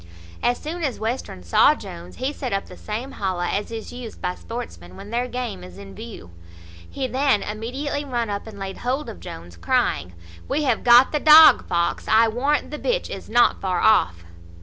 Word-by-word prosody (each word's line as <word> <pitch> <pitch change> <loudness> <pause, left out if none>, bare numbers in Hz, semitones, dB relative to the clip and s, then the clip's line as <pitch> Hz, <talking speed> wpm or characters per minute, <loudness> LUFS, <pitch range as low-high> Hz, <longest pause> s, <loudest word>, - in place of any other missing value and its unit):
As 245 - +1
soon 335 +3 -6
as 270 -5 -2
Western 220 - -4
saw 85 - +4
Jones, 85 +1 -10
he 270 +3 -3
set 255 -5 -4
up 195 - -1
the - - -12
same 230 +6 -5
holla 185 -5 -2
as 205 +1 -2
is 225 -1 -7
used 245 -3 -9
by 180 - -2
sportsmen 90 - -8
when 205 - -10
their 240 +2 -1
game 240 -7 -5
is 180 - -12
in 200 -1 -11
view. 220 - -10 0.6
He 270 - -3
then 260 -3 +1
immediately 260 +7 -4
run 240 -4 -2
up 205 +1 -4
and 215 -2 -10
laid 195 -1 -6
hold 260 +4 -2
of - - -9
Jones, 85 0 -10
crying, 85 0 0 0.3
"We 300 - 0
have 250 -6 0
got 245 +2 +7
the 300 - 0
dog 310 +1 +8
fox, 170 -1 -1
I 225 +1 +5
warrant 275 +8 0
the 300 - -5
bitch - - -1
is - - -8
not 240 +2 +3
far 185 -2 -1
off." 90 - +3
225 Hz, 195 wpm, -23 LUFS, 190-260 Hz, 0.6 s, dog